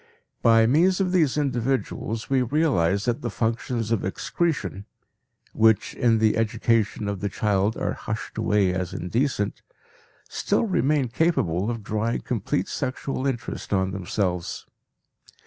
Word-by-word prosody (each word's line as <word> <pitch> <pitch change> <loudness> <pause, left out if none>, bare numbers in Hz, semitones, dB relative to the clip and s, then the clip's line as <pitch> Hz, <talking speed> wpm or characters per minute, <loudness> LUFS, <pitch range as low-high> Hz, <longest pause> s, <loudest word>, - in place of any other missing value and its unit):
By 115 -1 +5
means 170 - +3
of 185 -2 +1
these 160 -7 +2
individuals 125 -4 -1
we 135 -1 +2
realize 120 - +1
that 120 -1 0
the 120 - -2
functions 115 +2 -2
of 115 - +1
excretion, 100 - -2 0.7
which 110 -1 +3
in 115 -2 +3
the 110 0 +2
education 110 -1 +1
of 100 -2 -3
the 100 - -2
child 105 +1 0
are - - -1
hushed 110 0 -5
away 105 -4 +2
as 90 -2 -3
indecent, 110 +2 -1 0.7
still - - 0
remain 150 - +1
capable 110 - +1
of 115 -3 -4
drawing 110 +3 -1
complete 100 -5 -1
sexual 130 0 -3
interest 125 -4 -4
on 95 -1 +1
themselves. 90 -2 -2
115 Hz, 130 wpm, -25 LUFS, 100-130 Hz, 0.7 s, By